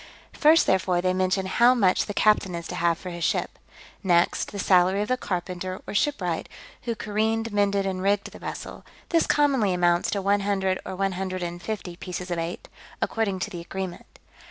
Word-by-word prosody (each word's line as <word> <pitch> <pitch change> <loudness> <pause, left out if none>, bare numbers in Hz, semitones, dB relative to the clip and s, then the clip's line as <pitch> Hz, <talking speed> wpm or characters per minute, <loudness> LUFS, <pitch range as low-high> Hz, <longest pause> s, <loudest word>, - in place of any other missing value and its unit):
First, 315 +2 +5
therefore, 180 -1 +2
they 185 +1 +1
mention 185 +1 +1
how 240 +6 +4
much 190 -6 +2
the 205 - -4
captain 210 -4 +3
is 170 0 -5
to - - -4
have 170 -1 +1
for 180 - -7
his 170 -1 -5
ship; - - -1 0.4
next, 175 -3 +2
the 205 - -7
salary 185 +1 +3
of 210 - -6
the 255 - +3
carpenter, 185 -3 -4
or - - -6
shipwright, 195 - 0 0.4
who 235 -1 -1
careened, 220 +1 -1
mended, 200 -1 +2
and 185 -1 -2
rigged 200 +1 +1
the - - -12
vessel: - - -7 0.3
this 330 -1 +2
commonly 270 -10 +3
amounts 175 -1 +2
to 200 - -1
one 200 +1 +3
hundred 195 -2 0
or 190 - -4
one 195 +1 0
hundred 185 0 -3
and 175 0 -5
fifty 195 -5 -5
pieces 180 0 -6
of 170 - -1
eight, 165 +2 -5 0.3
according 215 -4 -1
to - - -3
the 175 - -6
agreement. 185 0 -7
190 Hz, 195 wpm, -25 LUFS, 180-205 Hz, 0.4 s, First